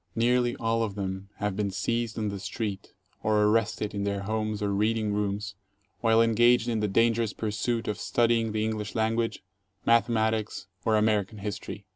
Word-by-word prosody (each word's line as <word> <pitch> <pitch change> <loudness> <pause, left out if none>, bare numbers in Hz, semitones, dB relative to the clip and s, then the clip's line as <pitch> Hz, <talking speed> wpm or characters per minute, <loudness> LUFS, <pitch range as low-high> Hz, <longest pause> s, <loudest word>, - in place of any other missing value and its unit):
Nearly 120 +1 +2
all 115 0 0
of 105 -3 -2
them 95 -1 -4
have 105 -2 -2
been 100 0 0
seized 115 +4 -2
on 105 -2 -1
the 100 -1 -5
street 100 0 -5 0.3
or 105 -1 +2
arrested 105 -1 +1
in 100 -1 -2
their 100 -1 -1
homes 110 0 -2
or 100 -1 0
reading 105 +1 +1
rooms 105 +1 -2 0.5
while 115 0 +4
engaged 120 +1 +4
in 115 -2 0
the 105 - +1
dangerous 115 +1 +2
pursuit 115 +2 -2
of 105 - -2
studying 115 -1 +2
the 110 0 -1
English 110 -1 -3
language, 115 0 0 0.4
mathematics, 110 -3 +2 0.2
or 110 - +3
American 105 -1 +1
history. 105 0 -6
110 Hz, 165 wpm, -28 LUFS, 105-115 Hz, 0.5 s, while